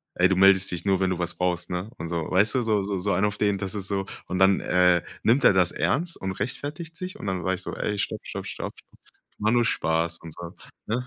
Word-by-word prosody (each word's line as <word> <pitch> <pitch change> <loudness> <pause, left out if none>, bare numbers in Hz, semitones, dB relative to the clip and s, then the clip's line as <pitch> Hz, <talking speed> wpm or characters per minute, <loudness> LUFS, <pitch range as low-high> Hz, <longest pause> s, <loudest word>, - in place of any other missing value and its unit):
„Ey, 90 - +5
du 95 - +1
meldest 95 0 +5
dich 85 -2 -4
nur, 95 -2 +2
wenn 95 -1 +1
du 90 - -1
was 85 -1 -2
brauchst, 90 -1 -1
ne”? 90 +4 -3
Und 85 - -5
so. 85 -2 -3
Weißt 100 +4 +3
du, 130 - +3
so 110 -3 +1
so 100 -1 -2
so 100 +1 0
einen 95 +3 +2
auf 105 0 -2
den, 100 -1 +1
das 95 +1 -3
ist 95 -2 -3
so 100 -1 -1 0.2
und 90 - -2
dann, 95 0 +5
äh, 90 -1 +3 0.2
nimmt 125 +5 +3
er - - +7
das 90 -2 +3
ernst 170 +4 -1
und 95 0 -3
rechtfertigt 145 - -5
sich. 185 +1 -6
Und - - -7
dann 95 -2 -2
sag 95 +2 +1
ich 95 - -7
so: - - -5
„Ey, 105 - -2
stopp, - - -3
stopp, - - -6
stopp, - - -5
stopp. - - -22 0.4
War 105 +1 +1
nur 120 -1 +3
Spaß”, 85 -6 0
und 80 - -9
so, 85 -1 -9 0.3
ne? 125 +3 -2
95 Hz, 265 wpm, -25 LUFS, 90-105 Hz, 0.4 s, er